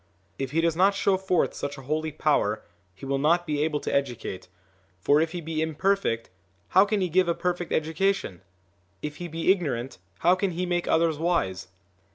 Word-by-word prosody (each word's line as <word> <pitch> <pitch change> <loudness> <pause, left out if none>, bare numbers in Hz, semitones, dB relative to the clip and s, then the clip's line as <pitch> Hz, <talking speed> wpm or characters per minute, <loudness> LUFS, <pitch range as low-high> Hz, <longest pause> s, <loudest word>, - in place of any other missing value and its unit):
If 135 -2 -2
he 160 +4 +1
does 165 -1 +1
not 195 +3 +4
show 200 -1 +2
forth 185 -2 +1
such 145 +1 -5
a 135 - -10
holy 155 +3 -2
power, 110 -9 +1 0.3
he 100 - -10
will 135 0 0
not 170 +5 +3
be 150 -2 0
able 155 -1 0
to - - -3
educate, 120 -9 -2 0.5
for 145 +10 +3
if 160 0 0
he 175 0 -5
be 160 -1 -3
imperfect, 160 - 0 0.4
how 190 +2 +6
can 205 -1 0
he 185 - +1
give 180 +2 +2
a 170 - +1
perfect 175 -1 -2
education? 160 - 0 0.6
if 150 0 -5
he 175 - -5
be 165 +2 +2
ignorant, 135 - -2 0.2
how 175 - +5
can 185 0 0
he 180 +2 -2
make 175 -1 -1
others 160 -2 +2
wise?" 100 - 0
160 Hz, 195 wpm, -26 LUFS, 145-180 Hz, 0.6 s, how